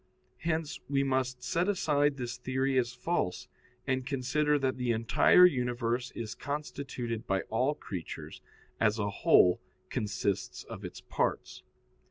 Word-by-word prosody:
Hence 160 -2 -2
we 140 -1 +2
must 130 -2 -1
set 180 +2 +1
aside 145 -7 +2
this 120 -2 -4
theory 130 +1 -1
as 120 -1 0
false, 125 - -2 0.4
and 130 -1 0
consider 145 +3 +1
that 130 -2 0
the 125 -1 0
entire 115 +10 +6
universe 125 -4 0
is 110 -2 -4
constituted 135 -5 -4
by 95 -1 +1
all 130 +6 +2
creatures, 90 - -7 0.4
as 110 -1 +3
a 105 -1 -1
whole 90 -2 +5 0.3
consists 100 -2 -2
of - - -9
its - - -7
parts. - - -2
130 Hz, 135 wpm, -30 LUFS, 115-145 Hz, 0.4 s, entire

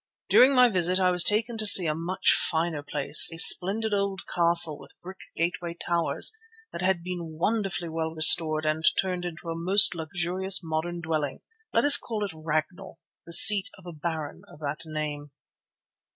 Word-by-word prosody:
During 265 +2 +3
my 250 -1 +4
visit 185 -3 -1
I 185 -1 0
was 180 -1 +2
taken 220 +3 0
to 215 - -5
see 185 -3 +7
a 155 - -2
much 170 +4 -2
finer 160 -2 -3
place, 145 0 +2
a 165 - -11
splendid 205 +6 +3
old 200 -1 -4
castle 170 -3 +3
with - - -18
brick 185 +1 -13 0.2
gateway 170 0 -5
towers, 170 - -2 0.4
that - - -8
had 185 -2 -2
been 170 -3 -9
wonderfully 195 -1 -4
well 160 0 -6
restored 155 -1 +5
and 155 +1 -4 0.2
turned 180 -2 -4
into 170 -1 -10
a 165 - -6
most 185 +5 +4
luxurious 180 +3 -3
modern 165 +2 -6
dwelling. 155 -4 -5 0.3
Let 230 - -1
us 285 -1 +8
call 215 -3 -6
it 200 - -9
"Ragnall," 160 +4 -7 0.3
the 170 - -2
seat 200 +1 +7
of 190 - -20
a 175 - -11
baron 155 -1 -8
of - - -18
that 145 0 -6
name. 150 -2 -8
170 Hz, 175 wpm, -24 LUFS, 160-190 Hz, 0.4 s, us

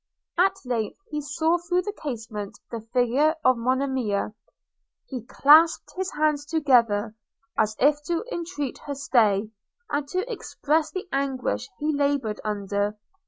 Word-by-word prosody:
At 385 +2 +4
length 230 -4 -2
he 300 0 -2
saw 320 +4 +1
through 355 +1 0
the 415 - -4
casement 225 - -6
the 230 -2 -4
figure 250 +7 +2
of 255 - +6
Monimia. 250 -4 0 0.7
He 255 -3 -5
clasped 315 +6 +5
his 375 0 -2
hands 300 -1 +1
together, 240 -9 +2 0.4
as 215 0 +1
if 295 +2 +3
to 345 +6 -1
entreat 325 -6 -4
her 285 - -3
stay, 220 -6 +2 0.4
and 290 0 -1
to 370 +8 -2
express 315 - -1
the 370 0 -5
anguish 265 - -1
he 305 +1 0
laboured 280 -7 0
under. 205 0 -1
275 Hz, 135 wpm, -25 LUFS, 225-310 Hz, 0.7 s, of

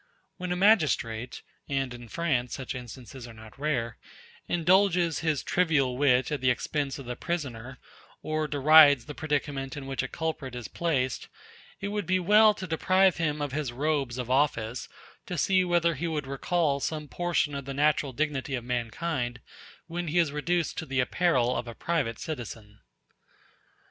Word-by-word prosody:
When 180 -1 -4
a - - +1
magistrate 150 - +2 0.3
(and 135 -2 -1
in 120 -1 -10
France 125 -3 -1
such 135 -2 -5
instances 125 0 -9
are 115 - -12
not 110 +3 -14
rare) 125 -7 -1 0.5
indulges 175 -1 +3
his 155 -3 0
trivial 150 -8 +1
wit 130 -1 +3
at 145 -3 -2
the 130 - +3
expense 135 +2 -1
of 140 - -9
the 125 0 -4
prisoner, 130 -6 -4 0.5
or 155 0 -1
derides 145 -2 +6
the 150 - -7
predicament 145 -3 -2
in 140 - -6
which 135 -1 -2
a - - -3
culprit 155 -6 -4
is 120 -3 -6
placed, 135 -7 -1 0.5
it 200 - -2
would 205 -4 -3
be 185 0 +2
well 210 +3 +6
to 190 - -6
deprive 185 +2 +3
him 150 -3 -1
of 145 - -3
his 145 -2 -2
robes 135 -1 -1
of 125 -1 -4
office, 125 -4 0 0.4
to 180 - -4
see 185 +5 +3
whether 175 -1 +2
he 165 +4 -3
would 155 -3 -2
recall 140 +2 0
some 150 +1 -3
portion 175 -2 0
of 140 -1 -5
the 135 - -5
natural 145 -1 +2
dignity 140 0 -2
of 125 - -4
mankind 120 +1 -2 0.5
when 175 +1 -4
he 160 +3 -1
is 165 -4 +3
reduced 165 +3 -1
to - - -6
the 135 -1 -1
apparel 125 -2 +2
of 120 0 -3
a 115 - -7
private 145 -10 -1
citizen. 115 -7 -7
145 Hz, 170 wpm, -28 LUFS, 125-170 Hz, 0.5 s, derides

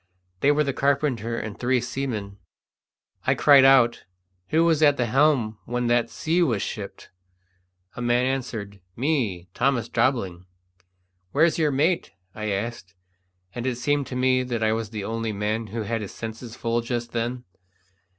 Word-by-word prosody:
They 140 - +4
were 150 +1 +3
the 140 -2 -1
carpenter 130 -5 0
and 105 -3 -6
three 125 +1 +2
seamen. 115 -6 -4 0.9
I - - +4
cried 140 -2 +7
out, 130 -3 +5 0.4
"Who 160 +6 +3
was 160 -2 +3
at 145 -2 +5
the 120 - +1
helm 120 -4 +2
when 125 +1 -2
that 120 -1 +2
sea 165 +8 0
was 120 - +1
shipped?" - - -7 0.8
A - - -6
man 120 +1 +2
answered, 115 -7 -4
"Me, 115 - -1
Thomas 125 -4 0
Jobling." 105 -8 0 0.9
"Where's 160 +3 +3
your 155 -2 +3
mate?" 155 +6 0 0.2
I 110 -1 -4
asked; 100 -2 -4 0.6
and 120 +1 -4
it 125 - 0
seemed 145 +3 0
to 125 - -6
me 130 0 +3
that 120 -3 -2
I 110 0 +3
was 110 -2 -3
the 105 -2 -5
only 115 +1 -3
man 105 +2 -2
who 110 +2 -4
had 115 +1 -2
his 100 - -7
senses 115 +1 -7
full 115 0 -1
just 120 0 -3
then. 120 +2 -2
120 Hz, 160 wpm, -24 LUFS, 110-135 Hz, 0.9 s, cried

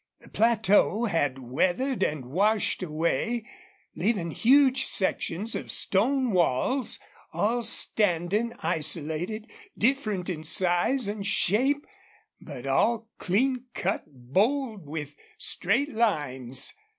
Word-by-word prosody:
The - - -17
plateau 220 0 +2
had 145 - 0
weathered 180 - -1
and 150 -4 -1
washed 200 - +1
away, 170 - -1 0.5
leaving 200 -7 -1
huge 265 - +4
sections 190 +2 0
of - - -5
stone 250 +5 +2
walls, 185 - 0 0.3
all 235 +4 0
standing 205 0 0
isolated, 165 +6 -1 0.3
different 215 -7 0
in 165 -5 -4
size 185 - +3
and 205 0 -4
shape, 245 +8 +1 0.6
but 135 -5 -9
all 225 +12 +1
clean 250 +7 0
cut, 195 +3 -2
bold, 195 - -1
with 150 -1 -6 0.2
straight 260 +11 +1
lines. 140 - +1
200 Hz, 100 wpm, -26 LUFS, 160-235 Hz, 0.6 s, huge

